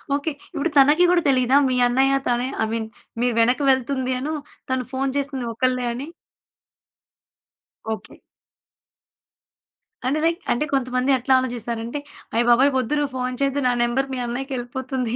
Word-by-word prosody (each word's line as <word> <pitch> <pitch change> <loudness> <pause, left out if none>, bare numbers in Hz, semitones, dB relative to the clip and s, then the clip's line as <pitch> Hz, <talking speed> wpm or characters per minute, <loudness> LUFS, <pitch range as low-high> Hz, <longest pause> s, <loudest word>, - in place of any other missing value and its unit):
Okay. 290 +3 -2 0.2
ఇప్పుడు 310 +4 -1
తనకి 295 +5 +6
గూడా 355 -1 +4
తెలీదా? 255 -1 +3
మీ 255 - +1
అన్నయ్య 265 +3 +3
తనే 245 +1 +1 0.2
అయ్ 220 - -1
మీన్ 225 -1 -2 0.3
మీరు 245 0 +2
వెనక్కి 245 +5 +2
వెళ్తుందీను, 260 +2 -1 0.4
తను 260 -1 0
ఫోన్ 270 +1 0
చేసింది 275 -3 -2
ఒక్కల్లే 255 +1 0
అని. 260 +5 -6 1.9
ఓకె. 220 - -9 1.9
అంటే 275 +4 +1
లైక్ 335 +1 +1
అంటే 270 +5 +1
కొంతమంది 255 0 0
ఎట్లా 260 +2 +1
ఆలోచిస్తారంటే 235 0 -4 0.4
అయ్‌ 235 - +3
బాబోయ్! 260 +4 +5
వద్దు 260 +3 0
నువ్వు 290 -2 -1
ఫోన్ 250 0 -2
చెయ్యొద్దు, 275 +1 +1
నా - - +3
నంబర్ 265 +3 0
మీ 255 - -3
అన్నయ్యకెళ్ళిపోతుంది 255 -1 -3
255 Hz, 140 wpm, -22 LUFS, 245-275 Hz, 1.9 s, తనకి